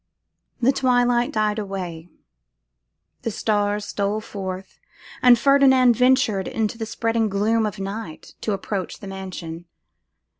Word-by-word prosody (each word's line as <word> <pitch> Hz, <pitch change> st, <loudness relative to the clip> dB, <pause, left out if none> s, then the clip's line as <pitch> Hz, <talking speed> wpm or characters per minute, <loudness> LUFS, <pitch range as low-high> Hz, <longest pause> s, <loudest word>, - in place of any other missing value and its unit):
The 250 Hz, +2 st, +4 dB
twilight 245 Hz, -2 st, +2 dB
died 215 Hz, 0 st, 0 dB
away, 180 Hz, -5 st, -6 dB, 1.1 s
the -, -, -2 dB
stars 205 Hz, -1 st, 0 dB
stole 205 Hz, +1 st, -1 dB
forth, 190 Hz, -3 st, -7 dB, 0.4 s
and 245 Hz, -1 st, +7 dB
Ferdinand 265 Hz, -2 st, +5 dB
ventured 250 Hz, -5 st, +2 dB
in 220 Hz, -, -1 dB
the 225 Hz, +1 st, -4 dB
spreading 225 Hz, 0 st, 0 dB
gloom 215 Hz, +3 st, +1 dB
of 210 Hz, 0 st, -6 dB
night 195 Hz, -3 st, -6 dB
to 215 Hz, -, -1 dB
approach 195 Hz, -1 st, -4 dB
the -, -, -11 dB
mansion. 185 Hz, -4 st, -7 dB
215 Hz, 120 wpm, -23 LUFS, 195-240 Hz, 1.1 s, and